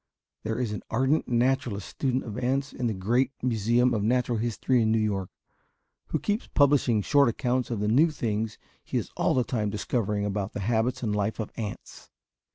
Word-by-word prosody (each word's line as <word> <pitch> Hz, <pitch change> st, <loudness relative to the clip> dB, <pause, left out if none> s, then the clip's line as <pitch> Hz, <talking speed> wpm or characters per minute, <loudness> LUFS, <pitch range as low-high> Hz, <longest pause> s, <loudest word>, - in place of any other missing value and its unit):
There 110 Hz, +1 st, -3 dB
is 120 Hz, -3 st, -1 dB
an 105 Hz, -, -4 dB
ardent 130 Hz, +6 st, +1 dB
naturalist 120 Hz, -4 st, 0 dB
student 130 Hz, -1 st, -1 dB
of 110 Hz, -4 st, -7 dB
ants 135 Hz, +2 st, -1 dB
in 125 Hz, -, -2 dB
the 110 Hz, -, 0 dB
great 120 Hz, +8 st, +1 dB
museum 120 Hz, +1 st, +2 dB
of 110 Hz, -, 0 dB
natural 120 Hz, +1 st, +1 dB
history 120 Hz, +2 st, +1 dB
in 110 Hz, -1 st, +2 dB
New 115 Hz, -, +3 dB
York, 100 Hz, -4 st, -1 dB, 0.8 s
who -, -, 0 dB
keeps 210 Hz, +3 st, -2 dB
publishing 140 Hz, -7 st, +3 dB
short 140 Hz, +2 st, +4 dB
accounts 125 Hz, +2 st, -1 dB
of 115 Hz, -4 st, -2 dB
the 105 Hz, -, 0 dB
new 140 Hz, +10 st, +5 dB
things 110 Hz, -6 st, -2 dB, 0.3 s
he -, -, -3 dB
is -, -, -3 dB
all -, -, +1 dB
the 125 Hz, -, +3 dB
time 110 Hz, -3 st, -1 dB
discovering 105 Hz, -1 st, -1 dB
about 100 Hz, 0 st, -2 dB
the 105 Hz, -, -4 dB
habits 115 Hz, +4 st, 0 dB
and 105 Hz, -3 st, 0 dB
life 105 Hz, +2 st, -1 dB
of 110 Hz, -, -4 dB
ants. 110 Hz, -3 st, -7 dB
115 Hz, 190 wpm, -27 LUFS, 105-125 Hz, 0.8 s, new